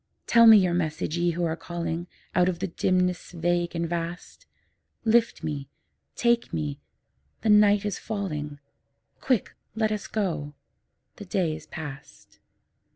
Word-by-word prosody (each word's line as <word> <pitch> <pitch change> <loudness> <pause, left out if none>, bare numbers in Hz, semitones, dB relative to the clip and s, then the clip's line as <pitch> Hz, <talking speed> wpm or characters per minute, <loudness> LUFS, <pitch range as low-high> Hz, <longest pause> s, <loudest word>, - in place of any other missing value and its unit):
Tell 230 -1 +6
me 220 -1 +10
your 185 -3 +3
message, 160 -2 -1
Ye 175 0 +1
who 170 +1 -1
are 160 -1 -1
calling 170 0 -4 0.3
Out 180 0 +4
of 180 - -2
the 190 - -2
dimness 180 0 0
vague 175 0 0
and 170 0 -1
vast; 170 - -5 0.6
Lift 230 +1 +3
me, 140 -3 -4 0.5
take 235 0 +2
me, 75 -3 -3 0.6
the 220 - 0
night 210 -1 +5
is 205 -2 -2
falling; 150 -9 -4 0.6
Quick, 255 -7 0 0.2
let 220 -1 +1
us 210 -1 -3
go, 165 -9 -2 0.6
the 205 - -8
day 175 -4 0
is 155 - -11
past. 145 -3 -10
175 Hz, 145 wpm, -26 LUFS, 160-205 Hz, 0.6 s, me